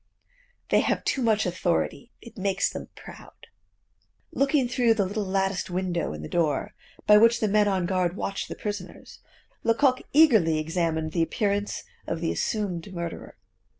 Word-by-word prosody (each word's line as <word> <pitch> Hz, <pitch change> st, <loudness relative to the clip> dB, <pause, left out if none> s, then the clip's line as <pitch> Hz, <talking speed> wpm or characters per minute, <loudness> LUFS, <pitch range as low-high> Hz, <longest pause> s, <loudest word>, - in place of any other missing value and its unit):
They -, -, +4 dB
have -, -, 0 dB
too 270 Hz, -, 0 dB
much 220 Hz, -3 st, +2 dB
authority; 180 Hz, +6 st, -1 dB
it 235 Hz, -, -13 dB
makes 195 Hz, -1 st, 0 dB
them -, -, -7 dB
proud." -, -, -13 dB, 0.9 s
Looking 275 Hz, -1 st, +2 dB
through 240 Hz, -2 st, +2 dB
the 200 Hz, -3 st, +1 dB
little 205 Hz, +3 st, -2 dB
latticed 195 Hz, 0 st, -1 dB
window 180 Hz, -, -2 dB
in 75 Hz, 0 st, -7 dB
the -, -, -5 dB
door, 155 Hz, -5 st, 0 dB, 0.3 s
by 210 Hz, -, +7 dB
which 230 Hz, +2 st, +5 dB
the 215 Hz, -, +1 dB
men 210 Hz, 0 st, +3 dB
on 190 Hz, -3 st, +1 dB
guard 180 Hz, -1 st, 0 dB
watch 195 Hz, -1 st, -3 dB
the -, -, -6 dB
prisoners, 205 Hz, -3 st, -7 dB, 0.4 s
Lecoq 255 Hz, +3 st, +3 dB
eagerly 220 Hz, -, +5 dB
examined 160 Hz, 0 st, -1 dB
the 170 Hz, -, 0 dB
appearance 205 Hz, +4 st, -1 dB, 0.2 s
of 165 Hz, -, -2 dB
the 165 Hz, 0 st, -1 dB
assumed 200 Hz, -4 st, -2 dB
murderer. 170 Hz, -2 st, -6 dB
195 Hz, 155 wpm, -26 LUFS, 170-220 Hz, 0.9 s, by